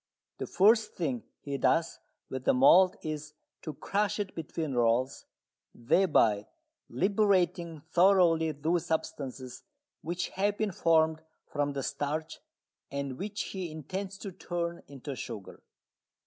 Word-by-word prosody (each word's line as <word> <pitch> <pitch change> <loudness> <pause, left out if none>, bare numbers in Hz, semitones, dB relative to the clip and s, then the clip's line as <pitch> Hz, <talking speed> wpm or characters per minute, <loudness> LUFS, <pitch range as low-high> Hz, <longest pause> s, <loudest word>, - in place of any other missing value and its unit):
The - - -3
first 215 +4 +4
thing 135 -9 -2 0.2
he 140 -1 -4
does 165 +5 +2 0.3
with 130 0 -6
the - - +4
malt 180 +10 +6
is 150 -1 -5 0.3
to 155 - -6
crush 210 +1 -1
it 200 -2 -3
between 160 -2 -4
rolls, 120 +2 +1 0.5
thereby 115 - +3 0.4
liberating 180 - +1
thoroughly 175 -2 +4
those 160 +4 -1
substances 130 -5 -4 0.4
which 175 +3 -3
have 200 +2 0
been 215 -2 0
formed 160 -2 +3 0.2
from 145 -1 -2
the 135 -1 -3
starch 155 +4 -3 0.5
and 140 -2 -4
which 205 +1 -4
he 185 -3 -4
intends 185 +6 -5
to 200 -1 -7
turn 170 -1 -4
into 140 0 -7
sugar. 110 -6 -8
160 Hz, 125 wpm, -30 LUFS, 140-185 Hz, 0.5 s, malt